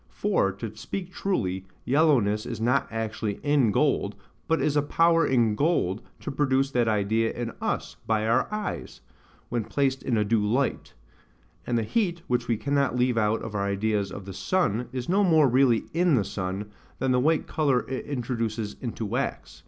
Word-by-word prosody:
For, 200 - +1
to 105 +2 -7
speak 180 - -6
truly, 95 - -2 0.2
yellowness 125 -7 +3
is 115 -3 -5
not 125 +5 +2
actually 110 -1 -3
in 145 -5 +3
gold, 100 - +1 0.3
but 165 - +2
is 150 - +1
a 145 - +4
power 165 +2 +3
in 120 -4 +3
gold 110 - +1 0.2
to - - -4
produce 135 -1 +1
that 120 -3 +2
idea 110 +1 +1
in 120 -1 -4
us - - -2
by 110 -1 +1
our 120 - +1
eyes, 210 0 -4 0.5
when 120 -2 -1
placed 135 +3 0
in 120 - 0
a 105 - +2
due 110 0 +2
light: 125 +6 -1 0.7
and 120 - +1
the 115 - +1
heat, 175 - -1
which 120 -1 -1
we 115 - +1
cannot 140 0 0
leave 125 -1 +2
out 110 +1 +1
of 110 - -6
our 100 -1 -1
ideas 100 0 0
of 95 - -8
the 95 - -7
sun, 125 - 0
is 125 -1 -4
no 195 +3 +3
more 160 -6 +5
really 125 -2 +3
in 170 -2 +3
the 105 -5 +1
sun, 95 +2 -4 0.3
than 130 - 0
the 125 - +3
white 155 +4 +2
colour 140 -5 +1
it 130 0 -4
introduces 115 -5 -3
into 115 -2 -4
wax. 125 +7 -3
120 Hz, 185 wpm, -26 LUFS, 110-145 Hz, 0.7 s, more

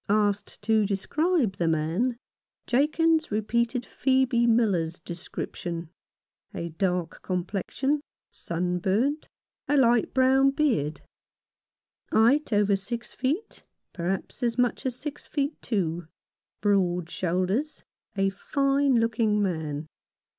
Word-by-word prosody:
Asked 205 -1 0
to 220 0 +3
describe 230 - 0
the 170 - 0
man, 165 +10 0 0.5
Jakins 315 +4 +2
repeated 235 +3 0
Phcebe 260 -2 +2
Miller's 195 -8 +2
description: 170 -1 -6 0.6
a 170 - -3
dark 180 0 -2
complexion, 200 +10 -1 0.3
sunburnt, 190 - -1 0.4
a 290 - +2
light 240 -3 +4
brown 265 +1 +4
beard; 260 - 0 1.1
height 250 +7 +4
over 205 -1 +3
six 230 +5 -5
feet, 295 - -2 0.3
perhaps 185 +1 -3
as 240 -1 0
much 245 +1 +1
as 250 - -2
six 290 +1 -7
feet 285 0 -2
two; 175 -7 -2 0.5
broad 180 -4 +2
shoulders; 185 - -1 0.3
a 195 0 +1
fine 275 +6 +1
looking 225 -2 +2
man. 160 -6 -2
215 Hz, 105 wpm, -27 LUFS, 180-265 Hz, 1.1 s, light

